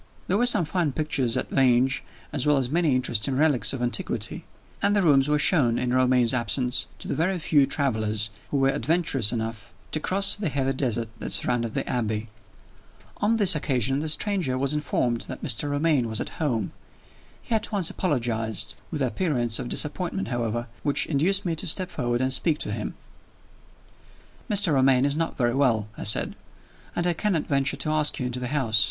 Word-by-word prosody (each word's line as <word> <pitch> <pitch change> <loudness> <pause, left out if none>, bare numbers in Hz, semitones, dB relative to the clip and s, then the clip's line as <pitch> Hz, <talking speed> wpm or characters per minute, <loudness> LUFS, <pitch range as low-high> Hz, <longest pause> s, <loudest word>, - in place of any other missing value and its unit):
There 190 - +1
were 245 - +4
some 180 -8 +5
fine 160 -3 -1
pictures 140 -6 -1
at - - -3
Vange, 130 0 +2 0.3
as - - 0
well 150 -1 +4
as 130 -1 -1
many 160 -4 +2
interesting 125 +1 0
relics 145 -4 +2
of 130 -3 -4
antiquity; 120 - -2 0.4
and 205 +1 +2
the 205 - +2
rooms 140 -3 +4
were 150 - +3
shown, 140 -6 +4
in 125 0 -1
Romayne's 125 -2 +3
absence, 125 +1 0
to - - -8
the - - -2
very 175 +6 0
few 145 -4 +2
travelers 110 -6 -1 0.2
who 145 - -1
were 135 0 +3
adventurous 140 - +1
enough 110 -3 -5 0.2
to 155 - 0
cross 195 +5 +2
the 205 -5 -2
heathy 135 -1 -1
desert 120 -4 -1
that - - -5
surrounded 120 -2 0
the - - -2
Abbey. 110 -2 -2 0.9
On 215 +2 +1
this 200 -4 +4
occasion, 135 -2 0
the 155 +1 -3
stranger 170 -6 0
was 140 +2 0
informed 125 -5 -1
that - - -8
Mr. 145 +7 -1
Romayne 145 -4 +1
was 110 - -2
at - - -6
home. 115 -10 -1 0.7
He - - -6
at 220 +1 +3
once 195 -6 0
apologized 115 - -2 0.2
with 150 -4 -2
an - - +2
appearance 125 -7 -1
of 120 - -5
disappointment, 180 +5 0
however, 120 -1 -2 0.2
which 145 - +2
induced 185 +7 +1
me 170 -2 -1
to 185 - -3
step 185 +3 -2
forward 120 -3 -1
and 130 0 +1
speak 155 +3 +2
to - - -2
him. - - -4 1.5
"Mr. 200 -6 +3
Romayne 130 -1 +4
is 140 0 0
not 165 +1 -2
very 120 -2 +1
well," 120 -6 +1
I - - -7
said; 105 - +3 0.6
"and 175 - 0
I 175 - +2
cannot 175 -3 -1
venture 140 0 0
to 155 +3 -1
ask 155 -1 +2
you 130 - -2
into 125 0 -3
the 125 - -3
house. 120 -6 +1
135 Hz, 190 wpm, -25 LUFS, 120-160 Hz, 1.5 s, some